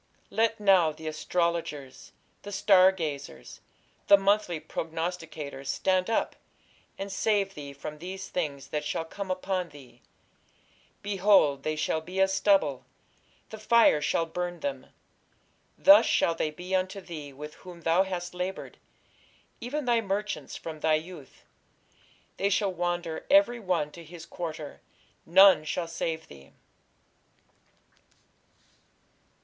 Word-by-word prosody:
Let 225 0 +1
now 190 -6 +4
the 155 +1 -12
astrologers, 155 -4 -3 0.3
the 205 - -9
star 195 -2 +5
gazers, 150 -6 -6 0.5
the 200 - +8
monthly 195 -4 +1
prognosticators, 160 -3 -5
stand 185 +6 +1
up, 225 - 0 0.6
and 195 0 -5
save 200 -1 0
thee 145 -3 -8
from 150 +2 -8
these 190 +3 -7
things 145 -6 -4
that 150 -1 -2
shall 155 +2 -3
come 195 +4 -7
upon 185 -1 -2
thee. 130 -4 -16 1.0
Behold, 195 -8 +3
they 155 +2 -2
shall 155 +1 -1
be 180 +4 -6
as 190 0 +3
stubble; 190 -9 +2 0.7
the 220 - -8
fire 220 -8 +4
shall 165 +2 +1
burn 175 +1 -5
them.... 285 -1 -4 0.9
Thus 295 +1 +7
shall 165 - +2
they 160 - -1
be 180 +4 -8
unto 185 +1 0
thee 160 -6 -8
with 150 +3 -9
whom 175 -2 -11
thou 165 +3 +3
hast 180 -2 -3
laboured, 180 +2 -5 0.8
even 280 +4 -4
thy 240 -2 +2
merchants, 195 -8 -3
from 160 -1 -8
thy 155 0 +3
youth: 155 -3 -8 0.9
they 200 - +1
shall 200 -1 +1
wander 175 -2 -3
every 290 -5 +5
one 180 -7 -1
to 170 - -11
his 165 +1 -11
quarter; 155 -5 -7 0.5
none 190 -2 +7
shall 165 +2 -3
save 165 -1 -4
thee. 70 -1 -15
175 Hz, 130 wpm, -28 LUFS, 155-195 Hz, 1.0 s, the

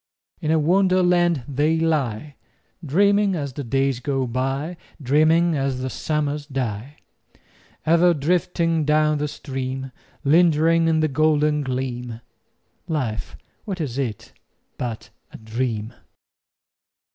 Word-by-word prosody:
In 155 - -2
a 160 - +4
Wonderland 175 -2 +3
they 150 +4 +1
lie, 145 -4 -1 0.5
Dreaming 200 +5 +3
as 140 -5 -4
the 140 - -5
days 135 +1 0
go 135 +1 -1
by, 135 +7 -2 0.2
Dreaming 155 +5 +3
as 135 -2 -1
the 130 0 -3
summers 150 -1 -2
die: 130 -1 -4 0.9
Ever 170 +2 +4
drifting 165 +1 +1
down 150 0 +2
the 150 - -1
stream— 135 -2 -5 0.3
Lingering 165 +1 +4
in 160 -1 +2
the 155 - +3
golden 150 0 +2
gleam— 125 -3 -4 0.7
Life, 120 - -3 0.3
what 190 -3 -4
is 140 -5 -3
it 115 -7 -4 0.5
but 120 -3 -5 0.2
a - - -10
dream? 110 0 -3
145 Hz, 115 wpm, -22 LUFS, 130-165 Hz, 0.9 s, a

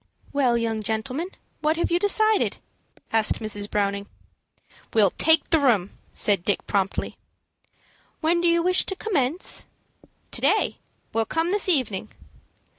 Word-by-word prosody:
"Well, 255 -4 +2
young 225 -2 -2
gentleman, 250 - -3 0.3
what 310 +2 0
have 340 - -1
you 345 - +3
decided?" 435 +2 +2 0.6
asked 220 -1 +3
Mrs. 205 -2 -2
Browning. 200 -1 -1 0.9
"We'll 205 -4 +5
take 320 -1 +3
the 325 - +5
room," 220 -9 +2 0.2
said 200 -4 +2
Dick, 205 - -1
promptly. 195 -1 -2 1.0
"When 340 +2 +1
do 345 - +2
you 335 0 +3
wish 365 +1 +4
to 385 - -3
commence?" 350 - -1 0.6
"To - - 0
day. - - +2 0.3
We'll 225 0 +1
come 325 +8 -1
this 405 -1 +2
evening." 225 - +1
260 Hz, 135 wpm, -24 LUFS, 215-340 Hz, 1.0 s, We'll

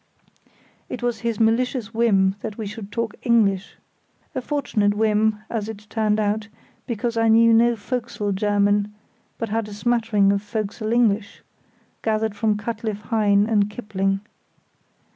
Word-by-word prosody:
It 245 - -6
was 240 -2 -1
his 230 -3 -2
malicious 230 0 +1
whim 200 -5 +3
that 215 -2 -6
we 220 - -4
should 205 0 -7
talk 230 -1 -2
English; 205 -5 +2 0.6
a 260 - -2
fortunate 220 -8 0
whim, 215 0 +2
as 220 -2 -3
it 210 -1 -8
turned 215 -1 +1
out, 215 +1 0 0.4
because 235 -1 -2
I 225 0 +3
knew 230 +1 +6
no 235 +1 +4
fo'c'sle 220 -2 -3
German, 205 +1 +1 0.4
but 230 - -3
had 225 0 -1
a 205 - -8
smattering 220 -3 +2
of 200 - -1
fo'c'sle 215 +1 -3
English, 220 -3 +1 0.6
gathered 220 -1 0
from 215 -1 +1
Cutcliffe 215 -1 -4
Hyne 205 -2 +3
and 210 -2 +2
Kipling. 195 -3 -2
215 Hz, 145 wpm, -23 LUFS, 205-230 Hz, 0.6 s, knew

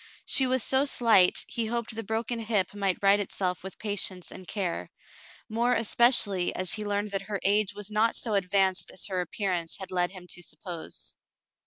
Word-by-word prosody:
She 265 - +5
was 255 -2 +1
so 265 +1 +3
slight 225 -9 +4
he 230 -2 -2
hoped 235 -1 -3
the 225 +1 -4
broken 225 +2 -2
hip 215 -5 0
might 195 -3 0
right 200 +1 +5
itself 185 -2 -2
wdth 190 0 -8
patience 200 -4 -2
and 185 - -10
care, 190 -5 -3 0.6
more 235 +2 +1
especially 225 -5 +3
as 185 -1 0
he 215 - -3
learned 205 0 -2
that 195 -1 -1
her 205 -2 -2
age 205 +1 +2
was 205 0 -7
not 220 +2 +2
so 225 -3 -2
advanced 190 -1 +1
as - - -1
her 185 -2 -2
appearance 180 -2 -3
had 190 -1 -9
led 180 -1 +1
him 185 -2 -12
to 180 - -4
suppose. 175 -1 -6
205 Hz, 185 wpm, -27 LUFS, 185-225 Hz, 0.6 s, She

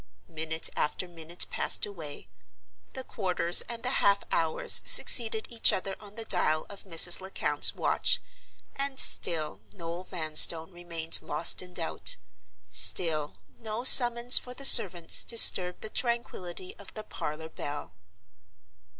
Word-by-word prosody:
Minute 160 0 -3
after 165 +4 -6
minute 170 0 -5
passed - - 0
away; 165 -8 -13 0.7
the 260 - -10
quarters 180 -7 -1
and 235 -1 -10
the 255 +1 -4
half 200 0 -1
hours 160 -1 -1
succeeded 220 -2 +5
each 230 - +2
other 190 +1 -7
on 205 -1 -18
the 225 0 -10
dial 155 -6 -3
of 200 0 -16
Mrs. 175 0 +2
Lecount's 190 +1 0
watch, - - -3 0.6
and 275 -1 -6
still 155 - 0
Noel 170 - -11
Vanstone 160 -1 +1
remained 170 -2 -4
lost 165 - -2
in 180 -1 -17
doubt; 165 -2 -2 0.6
still 155 - +1 0.2
no 225 0 -9
summons 240 -1 +6
for 250 0 -15
the 275 - -6
servants 175 -9 +4
disturbed 180 -6 +4
the - - -8
tranquillity 190 -7 -7
of 200 - -13
the 215 - -10
parlor 160 -5 -11
bell. 145 - -11
180 Hz, 135 wpm, -24 LUFS, 160-220 Hz, 0.7 s, summons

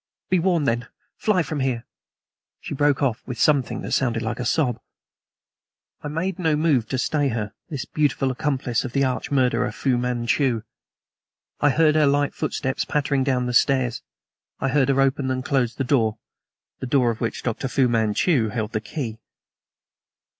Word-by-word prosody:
Be 185 - +4
warned, 170 -4 +1
then; 115 +1 0 0.3
fly 190 -5 +1
from 150 0 -4
here 125 -3 -1 0.4
" - - -70
She - - -6
broke 145 0 +2
off 125 -5 0
with 125 -3 -5
something 145 -5 +2
that - - -6
sounded 120 -3 +1
like 110 +2 -3
a 125 - -2
sob. 125 -2 +1 1.2
I - - -5
made 175 +6 -2
no 160 -4 +2
move 150 -7 +2
to 130 - -1
stay 145 +3 +1
her 110 -4 -3 0.2
this 145 -6 -4
beautiful 145 -3 0
accomplice 130 -3 -1
of 130 -2 -6
the 140 - +2
arch 130 -1 -1
murderer, 130 -3 +1
Fu 130 -3 0
Manchu. 120 0 0 1.0
I 145 - +4
heard 155 +2 +4
her 155 -1 +4
light 145 0 +2
footsteps 130 0 -2
pattering 140 -2 0
down 130 -2 +1
the 125 - -2
stairs, 125 -2 +2 0.6
I 135 - 0
heard 135 0 +2
her 135 0 +2
open 135 0 +1
and 130 0 -2
close 125 -4 +1
the 135 - -1
door 115 -5 +1 0.6
the 130 - -4
door 125 -2 +3
of 115 - -7
which 115 - -2
Dr. 125 +2 -2
Fu 130 0 +2
Manchu 115 - +2
held 110 -1 -3
the 110 - -2
key. 110 -2 -5
130 Hz, 175 wpm, -23 LUFS, 120-145 Hz, 1.2 s, Be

